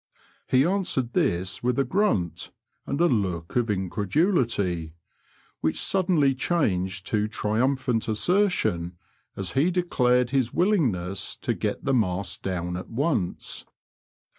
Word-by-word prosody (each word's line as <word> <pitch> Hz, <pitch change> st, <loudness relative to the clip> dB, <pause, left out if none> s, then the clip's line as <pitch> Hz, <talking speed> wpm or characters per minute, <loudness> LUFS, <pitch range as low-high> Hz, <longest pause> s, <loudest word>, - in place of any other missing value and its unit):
He 130 Hz, +2 st, +4 dB
answered 170 Hz, -10 st, 0 dB
this 90 Hz, +2 st, 0 dB
with 125 Hz, 0 st, 0 dB
a 135 Hz, -, +2 dB
grnnt 125 Hz, -, 0 dB, 0.4 s
and 140 Hz, -, -2 dB
a 170 Hz, -, +5 dB
look 95 Hz, -, -1 dB
of 120 Hz, -2 st, +2 dB
increduUty, 100 Hz, -, 0 dB, 0.7 s
which 80 Hz, -1 st, 0 dB
suddenly 170 Hz, -8 st, +2 dB
changed 95 Hz, -, -1 dB
to 105 Hz, -1 st, 0 dB
triumphant 115 Hz, +2 st, 0 dB
assertion 110 Hz, -, +1 dB, 0.4 s
as 95 Hz, -2 st, -1 dB
he 140 Hz, +6 st, +2 dB
declared 125 Hz, -9 st, +2 dB
his 130 Hz, -4 st, +1 dB
willingness 125 Hz, -, +1 dB
to -, -, 0 dB
get -, -, -3 dB
the 135 Hz, -, +2 dB
mast 95 Hz, -6 st, -1 dB
down 90 Hz, -2 st, -3 dB
at 90 Hz, -, -8 dB
once. 130 Hz, -, -2 dB
115 Hz, 120 wpm, -25 LUFS, 95-140 Hz, 0.7 s, a